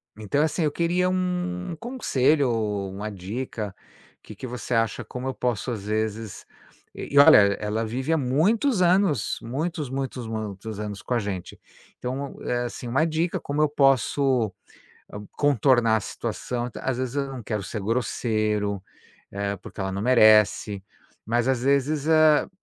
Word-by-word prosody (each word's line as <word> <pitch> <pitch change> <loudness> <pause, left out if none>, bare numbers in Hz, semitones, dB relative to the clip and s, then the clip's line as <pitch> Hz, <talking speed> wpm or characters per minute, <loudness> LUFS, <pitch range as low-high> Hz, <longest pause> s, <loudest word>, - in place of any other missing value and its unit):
Então, 110 +8 0
assim, 160 +2 0
eu 150 - +1
queria 175 +3 +1
um 180 -1 -2
conselho 145 - +1
ou 105 -4 -2
uma 105 +3 -5
dica, 105 +1 -5 0.5
que - - -12
que 130 - -7
você 125 0 -5
acha, 115 +1 0
como 125 +4 -6
eu 130 - -2
posso 120 0 -2
às 105 -4 -5
vezes 110 -1 -3 0.5
e, 140 - +2
olha, 140 - +9 0.2
ela 105 +2 -2
vive 130 +7 -3
há 160 - +3
muitos 185 - +2
anos, 175 - +2
muitos, 150 +5 -3
muitos, 130 -2 -4
muitos 110 -1 -5
anos 105 -1 -5
com - - -3
a 120 - +2
gente. 100 -4 -5 0.4
Então, 130 +3 -4
eh, 120 0 -1
assim, 120 0 -6
uma 135 +7 +2
dica, 165 +2 -1
como 145 +1 -2
eu 155 - +3
posso 135 -4 +2 0.8
contornar 125 -5 +3
a - - +2
situação. 120 +4 -4
Às 130 -2 -1
vezes 130 +1 -3
eu 140 -1 0
não 130 - -6
quero 105 -2 -3
ser 105 +3 -5
grosseiro, 110 -3 -1 0.5
eh, 100 0 -2
porque - - -11
ela 95 0 -1
não 95 - -3
merece, 105 -4 +4 0.4
mas 120 +2 +1
às 125 -2 +1
vezes 140 +2 +1
a 155 -1 +5
125 Hz, 155 wpm, -25 LUFS, 110-145 Hz, 0.8 s, olha